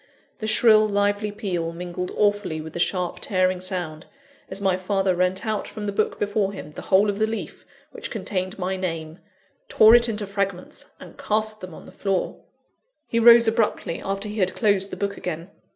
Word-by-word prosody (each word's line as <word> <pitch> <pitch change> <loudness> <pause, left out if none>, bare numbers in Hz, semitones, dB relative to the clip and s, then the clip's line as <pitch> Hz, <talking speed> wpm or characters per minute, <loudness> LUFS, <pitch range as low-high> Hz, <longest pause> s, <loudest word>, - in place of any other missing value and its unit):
The 215 - -3
shrill, 215 -1 +5
lively 205 +1 +1
peal 175 -5 -3
mingled 180 +1 -5
awfully 205 -6 +1
with 160 0 -8
the - - -5
sharp, 180 0 -1
tearing 185 -2 0
sound, 175 -4 -4 0.4
as 190 - -4
my 190 -2 +2
father 190 0 0
rent 185 +1 0
out 215 -2 -2
from 210 -2 -7
the 205 - -1
book 210 +2 0
before 205 -1 0
him 150 -6 -8
the - - -8
whole 195 +2 +3
of 205 0 -2
the 220 - +2
leaf 225 0 -6 0.2
which - - -7
contained 185 0 -3
my 190 0 -2
name; 165 -3 -4 0.5
tore 220 - +7
it 240 0 +6
into 210 -2 -2
fragments, 200 -2 -4
and - - -13
cast 215 0 0
them 185 -3 -8
on - - -12
the - - -13
floor. 195 -2 -2 0.7
He 230 - 0
rose 235 0 +8
abruptly, 220 -6 0
after 195 +2 -3
he 210 +1 -5
had 185 -1 +1
closed 200 -3 +2
the - - -7
book 200 0 -2
again. 170 +1 -5
195 Hz, 190 wpm, -24 LUFS, 180-210 Hz, 0.7 s, rose